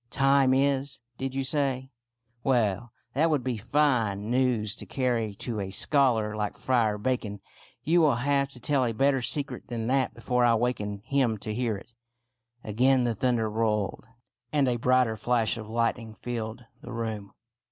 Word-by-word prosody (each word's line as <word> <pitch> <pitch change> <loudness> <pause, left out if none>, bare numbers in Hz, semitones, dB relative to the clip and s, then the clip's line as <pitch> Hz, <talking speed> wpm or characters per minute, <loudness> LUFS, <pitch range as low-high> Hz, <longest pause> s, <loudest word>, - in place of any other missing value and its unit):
" - - -45
' - - -45 0.2
Time 135 -1 +5
is,' 140 +1 +1 0.2
did 135 0 -3
you 135 - 0
say? 135 -2 -1 0.5
Well, 120 -3 +1 0.2
that 155 +5 +2
would 150 -5 +1
be 125 -2 -2
fine 115 -5 +1
news 120 -5 +1
to - - -8
carry 120 -5 -1
to 110 +1 -3
a 95 -1 -3
scholar 110 -1 +2
like 105 -1 -3
Friar 115 -5 +1
Bacon. 105 -3 -2 0.4
You 170 +3 +3
will 150 -6 +4
have 140 +2 +1
to 125 - -10
tell 135 +2 +1
a 115 -2 0
better 135 +2 +2
secret 135 0 -1
than 115 -2 -4
that 130 +1 +1
before 125 +2 0
I 120 -1 +5
waken 105 -4 -2
him 130 -5 +1
to 105 +1 -5
hear 115 -2 -1
it." 115 +4 -15 0.7
Again 125 +4 +2
the 120 -1 +1
thunder 115 0 0
rolled, 110 0 -1 0.4
and 145 -3 +2
a 120 -1 +1
brighter 125 -1 +2
flash 115 0 +1
of 110 -2 -8
lightning 115 -1 -1
filled 115 0 -5 0.2
the 120 - -9
room. 110 -3 -4
120 Hz, 175 wpm, -27 LUFS, 110-130 Hz, 0.7 s, Time